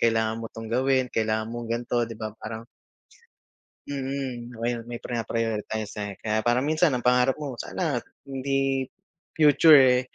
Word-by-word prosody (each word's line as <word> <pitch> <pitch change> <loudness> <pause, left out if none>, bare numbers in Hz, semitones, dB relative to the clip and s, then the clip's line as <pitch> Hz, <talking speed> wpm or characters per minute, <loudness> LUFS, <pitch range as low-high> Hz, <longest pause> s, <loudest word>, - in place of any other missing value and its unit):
kailangan 110 -1 +1
mo - - -6
'tong 115 0 -7
gawin, 130 +1 +2
kailangan 110 0 0
mong 120 -1 -5
ganto 120 0 0
'di 115 - -6
ba, 110 -1 -4
parang 110 +1 -7 1.2
Hmm 145 - -3 0.6
mm, 115 - -11
may 120 +1 0
may 120 0 -6
prina-prioritize, 110 -2 -2
eh, 100 - -5
kaya 110 0 -1
parang 125 +4 +2
minsan 155 0 +3
ang 125 - 0
pangarap 125 +2 +4
mo 140 -4 -5
sana 155 +3 -2 0.3
hindi 135 0 0 0.5
future, 150 0 +7
eh. 125 -1 +5
120 Hz, 155 wpm, -26 LUFS, 115-135 Hz, 1.2 s, future